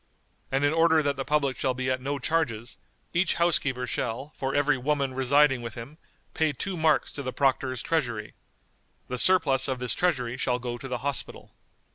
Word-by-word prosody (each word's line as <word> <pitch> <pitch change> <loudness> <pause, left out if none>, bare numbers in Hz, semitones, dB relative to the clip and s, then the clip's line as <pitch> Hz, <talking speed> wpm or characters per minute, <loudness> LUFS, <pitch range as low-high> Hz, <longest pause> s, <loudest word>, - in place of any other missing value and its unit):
"and 135 +2 +2
in 145 - +2
order 160 -1 +4
that 145 -1 0
the 135 - -3
public 140 -2 +1
shall 130 -2 0
be 130 0 -3
at 130 0 -1
no 140 +2 -2
charges, 125 -6 -2 0.3
each 175 +1 +2
housekeeper 140 -7 +1
shall, 125 +4 -3
for 135 0 -3
every 145 0 +3
woman 140 0 -1
residing 135 0 +3
with 115 -2 -7
him, 135 +7 -9 0.3
pay 160 -1 +1
two 185 +7 -4
marks 160 -2 +2
to 145 - -6
the 130 -2 -4
Proctor's 130 -2 0
treasury. 120 -10 -2 0.8
The 125 0 -2
surplus 160 -7 +4
of 130 -2 -1
this 125 -1 -2
treasury 130 -9 0
shall 125 -1 0
go 120 -1 -5
to 135 - -7
the 125 +1 -4
Hospital." 140 -1 -3
135 Hz, 185 wpm, -27 LUFS, 125-150 Hz, 0.8 s, order